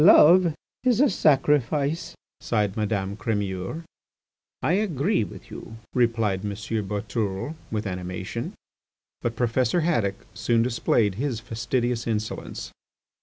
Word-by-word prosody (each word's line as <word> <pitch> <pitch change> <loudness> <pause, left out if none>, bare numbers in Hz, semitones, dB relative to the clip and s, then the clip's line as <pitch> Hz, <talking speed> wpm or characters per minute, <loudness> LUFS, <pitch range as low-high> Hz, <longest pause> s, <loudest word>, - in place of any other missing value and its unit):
"Love 170 0 +7 0.3
is 245 -3 +3
a 285 -3 +5
sacrifice," 150 +1 +2 0.2
sighed 105 -4 0
Madame 100 -2 -1
Crémeur. 105 - -2 0.8
"I 165 - +3
agree 190 - +1
with - - -10
you," 110 - -8 0.2
replied 115 -6 +2
M. 105 -1 -2
Boutourlé 105 +2 -2 0.2
with 110 -1 -2
animation. 90 -1 -4 0.7
But 120 -1 -1
Professor 125 +7 +2
Haddock 115 - 0
soon 115 +3 +2
displayed 115 -3 +2
his 135 -6 -1
fastidious 120 +1 -1
insolence. 110 -1 -3
115 Hz, 110 wpm, -25 LUFS, 105-145 Hz, 0.8 s, Love